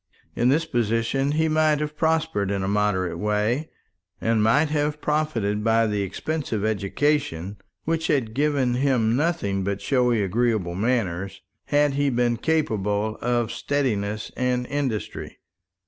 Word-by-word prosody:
In 120 - +2
this 155 +5 +2
position 120 +2 0
he 160 +1 +2
might 155 -1 +2
have 150 0 -3
prospered 160 -11 0
in 100 -1 -1
a - - -1
moderate 95 -4 0
way, 105 - 0 0.5
and 115 -1 +1
might 145 +9 +3
have 150 0 -1
profited 120 -10 -1
by 115 0 +3
the 105 -2 -1
expensive 110 - -3
education 105 - -1 0.3
which 165 0 -1
had 125 -8 0
given 140 -2 +1
him 125 -3 +2
nothing 130 - 0
but 100 +1 -2
showy 125 -5 +2
agreeable 105 -3 0
manners, 100 -3 -1 0.2
had 145 -1 +2
he 145 0 +1
been 120 -2 +1
capable 110 -9 0
of 120 -1 0
steadiness 110 -7 -2
and 125 -1 0
industry. 135 -6 -3
120 Hz, 135 wpm, -24 LUFS, 105-145 Hz, 0.5 s, might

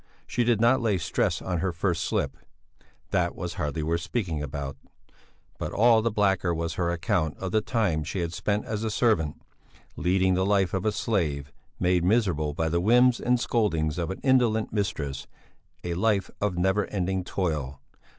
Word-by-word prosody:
She 120 - 0
did 120 -2 +2
not 120 +3 +4
lay 110 -4 +1
stress 85 - -1
on 90 -2 -2
her 95 +2 0
first 85 0 -1
slip, - - -1 0.8
"that 85 -1 +1
was 90 -2 -4
hardly 75 +1 -3
worth 85 +2 0
speaking 85 -6 -2
about"; 70 -1 -5 0.8
but - - -3
all 115 +1 +5
the 115 - +1
blacker 95 -5 +1
was 85 0 -2
her 85 -1 -1
account 85 -2 -1
of 95 -1 -4
the 110 - +2
time 105 -9 0
she 85 +5 -4
had 85 0 -3
spent 105 +3 -1
as 110 0 -3
a 110 - 0
servant, 105 -9 +1 0.6
leading 95 +3 +2
the 95 +1 +1
life 95 -2 +2
of 95 0 -1
a - - +3
slave, 75 -11 -1 0.3
made 90 -1 +2
miserable 90 -8 +1
by 80 0 0
the 85 +2 0
whims 120 +4 +4
and 125 0 +2
scoldings 85 -10 0
of 85 - -2
an 95 - -5
indolent 120 -6 +2
mistress, 75 -10 -2 0.6
a 85 - -2
life 100 +1 +1
of 100 -3 0
never 95 +3 +1
ending 95 -1 -1
toil. 75 -8 -2
95 Hz, 180 wpm, -26 LUFS, 80-110 Hz, 0.8 s, all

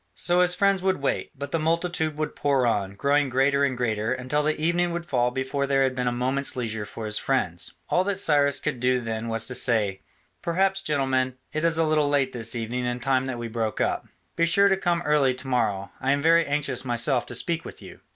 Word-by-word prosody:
So 175 +1 +2
his 180 0 +4
friends 200 -1 +2
would 190 -2 0
wait, 140 - -1
but 140 +1 -6
the 165 - 0
multitude 160 -1 -1
would 155 0 -3
pour 140 -3 +1
on, 100 -4 -1
growing 140 +5 +1
greater 135 +2 +2
and 135 -3 0
greater, 110 -2 -1
until 130 +3 -1
the 155 +1 -1
evening 170 +2 +1
would 170 0 -4
fall 125 -6 +1
before 130 +2 -2
there 135 0 +3
had 130 -1 +1
been 125 -1 -2
a - - +2
moment's 130 +3 0
leisure 110 -4 -3
for 110 - -7
his 105 0 -1
friends. 90 -10 -2
All 180 - +2
that 200 -1 -1
Cyrus 145 -5 +3
could 150 -5 -3
do 125 +1 +2
then 115 -1 -4
was 115 -1 -1
to 130 - -5
say, 105 -6 +1 0.4
"Perhaps, 190 +3 +1
gentlemen, 130 -5 0 0.2
it 155 +1 -2
is 165 -1 +2
a 165 - +3
little 155 -2 +2
late 140 -2 +1
this 115 0 -2
evening 120 +2 -3
and 120 0 -2
time 130 +1 0
that 125 -2 -3
we 120 0 -5
broke 110 -1 -3
up. - - -1 0.3
Be 170 - +2
sure 200 +3 +5
to 195 - +3
come 175 -2 -1
early 145 -5 +2
to 130 +1 -8
morrow. 110 -6 -1
I 135 +2 +1
am 140 - -1
very 165 +1 +4
anxious 140 -3 -1
myself 120 +1 0
to 120 - -6
speak 165 +7 -1
with - - -10
you." - - -12
135 Hz, 230 wpm, -25 LUFS, 120-155 Hz, 0.4 s, sure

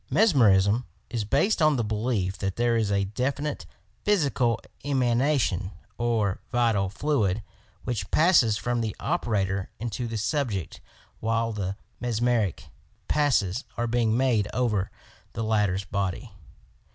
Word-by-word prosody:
Mesmerism 115 - +4 0.3
is 115 -4 -2
based 155 - +2
on 155 -1 +5
the 120 - 0
belief 105 -3 -1
that 95 -2 -2
there 120 0 +2
is 110 -3 +1
a 100 -1 +2
definite 135 +8 -2 0.4
physical 140 - +2 0.2
emanation 125 - +1 0.3
or 115 -5 +1
vital 115 -6 +2
fluid, 110 -4 0 0.4
which 120 -4 -3
passes 155 - +4
from 120 +2 -1
the 110 -2 -3
operator 95 -3 -1
into 120 +1 -3
the 115 -1 -3
subject 110 - -2 0.4
while 115 +1 0
the 100 -2 -3 0.2
mesmeric 120 -5 0 0.4
passes 130 -7 +1
are 120 - 0
being 115 -1 +1
made 120 -6 +2
over 110 -6 +1 0.4
the 115 - -3
latter 105 -4 +1
's 95 - -5
body. 100 +4 -3
115 Hz, 125 wpm, -26 LUFS, 100-125 Hz, 0.4 s, on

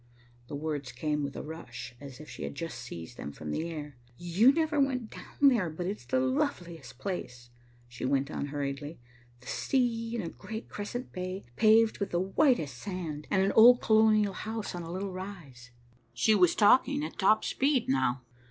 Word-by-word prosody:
The 145 - -6
words 145 -3 -3
came 150 +4 -2
with 140 -1 -4
a - - -5
rush, 125 -6 -8
as 140 -2 -10
if 155 - -11
she - - -10
had - - -5
just 165 +2 -5
seized 85 +8 -8
them 70 - -6
from 75 +1 -7
the 165 - -2
air. 150 -4 -7 0.2
"You 180 +9 +4
never 310 0 0
went 255 -5 0
down - - -12
there, 225 -10 +3
but 160 +3 -5
it 195 +3 -1
is - - -18
the 260 - +1
loveliest 260 - -2
place," 125 -11 -6 0.4
she 120 0 -9
went 140 +2 +1
on 145 - -3
hurriedly. 145 +2 -4 0.4
"The - - -18
sea, 230 - 0
in 225 - -2
a 165 - -4
great 220 +6 -8
crescent 240 +5 -5
bay, 185 +1 -4
paved 220 - +4
with 200 - -1
the 175 - 0
whitest 190 - +1
sand, 170 -6 -5
and 190 -1 +3
an 195 - +2
old 245 +2 +8
colonial 215 -2 +4
house 220 +2 -5
on 175 - -5
a 165 0 -7
little 190 +2 -3
rise." 170 -11 -9 0.5
She 170 - +4
was 180 -5 +4
talking 265 +7 +4
at - - -9
top 215 +2 +4
speed 270 -2 +1
now. 130 -1 +1
180 Hz, 190 wpm, -30 LUFS, 145-220 Hz, 0.5 s, old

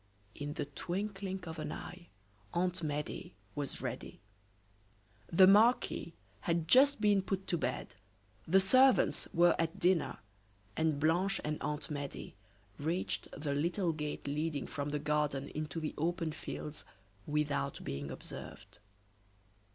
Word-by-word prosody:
In 145 0 -5
the - - -2
twinkling 190 +5 -4
of 160 -2 -6
an 155 - -3
eye 175 0 -8 0.5
Aunt 180 +1 +1
Medea 150 -1 -3 0.2
was 145 -2 -4
ready. - - -5 1.1
The 185 +3 +8
marquis 205 -4 +4 0.2
had 165 +4 0
just 275 - +6
been 205 -2 +4
put 190 0 -2
to 175 - +1
bed, 125 -3 -2 0.5
the 190 +4 +6
servants 255 +7 +4
were 175 0 +5
at 165 0 0
dinner, 180 -2 +2 0.6
and 160 -3 +1
Blanche 175 +6 +2
and 150 0 -2
Aunt 150 +1 -3
Medea 145 -2 -5 0.5
reached 165 +5 -1
the 145 -1 -1
little 170 +4 +1
gate 150 -1 -4
leading 150 +1 -1
from 145 0 -3
the 150 - -1
garden 150 -2 0
into 155 0 -4
the 155 -1 -3
open 165 0 0
fields 150 0 -6 0.4
without 145 -2 0
being 70 +1 -4
observed. - - -9
160 Hz, 130 wpm, -34 LUFS, 150-185 Hz, 1.1 s, The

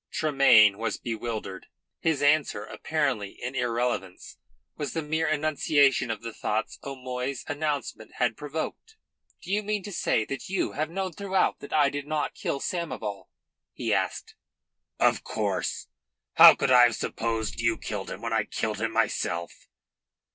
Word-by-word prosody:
Tremayne 135 -9 +5
was 115 -1 -2
bewildered. 110 -4 -5 0.3
His 155 -3 0
answer, 145 -8 +2
apparently 130 -5 -2
an 125 +2 -3
irrelevance, 120 -6 -2 0.4
was 145 -4 -4
the 160 - -2
mere 160 +2 0
enunciation 145 -4 +2
of 115 0 -4
the 115 -1 -6
thoughts 110 +1 -2
O'Moy's 130 -1 -5
announcement 145 -6 -3
had 120 -3 +1
provoked. 160 - -6 0.5
"Do - - -6
you 210 +1 +2
mean 210 -1 -2
to 205 - -7
say 110 - +1
that 135 +5 -6
you 190 -1 0
have 155 +2 -2
known 190 +1 -3
throughout 190 +1 0
that 140 - -10
I 145 -2 +3
did 145 0 -5
not 155 -1 -1
kill 140 - -3
Samoval?" 125 - -4 0.5
he - - -1
asked. - - -2 0.7
"Of - - +3
course. - - -2 0.5
How - - +10
could 135 - 0
I 125 -1 +8
have 120 -2 +1
supposed 115 -2 -3
you - - +1
killed - - -5
him - - -7
when - - -2
I - - +1
killed - - -3
him - - 0
myself?" 85 +1 -2
140 Hz, 155 wpm, -27 LUFS, 115-155 Hz, 0.7 s, How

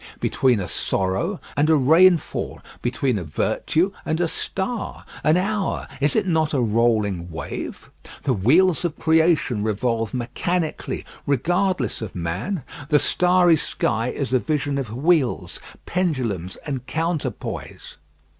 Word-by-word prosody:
between 125 -5 +2
a 90 - -3
sorrow 95 - -1 0.2
and 150 +2 +2
a 160 - +6
rainfall? 165 +5 +3 0.2
between 120 -1 0
a - - -5
virtue 160 - 0
and 160 +1 -1
a 175 - +2
star? 200 +7 -3 0.2
An 155 +3 +4
hour, 200 +1 -1
is 140 0 +3
it - - +2
not 160 -4 +1
a - - +2
rolling 110 -6 +1
wave? 80 - -6 0.3
The 135 - +2
wheels 160 - +3
of 165 -3 -2
creation 160 -8 +2
revolve 115 +1 -1
mechanically 155 +7 -2 0.2
regardless 175 +7 0
of 110 - -6
man. 95 - -3 0.3
The 150 - +5
starry 180 +1 +4
sky 115 -5 -1
is 130 0 -3
a 130 - +5
vision 145 -1 -1
of 130 -5 -4
wheels, 140 +1 +1 0.3
pendulums, 125 - -1
and 135 -4 -3
counterpoise. 160 -4 -4
140 Hz, 130 wpm, -23 LUFS, 115-170 Hz, 0.3 s, a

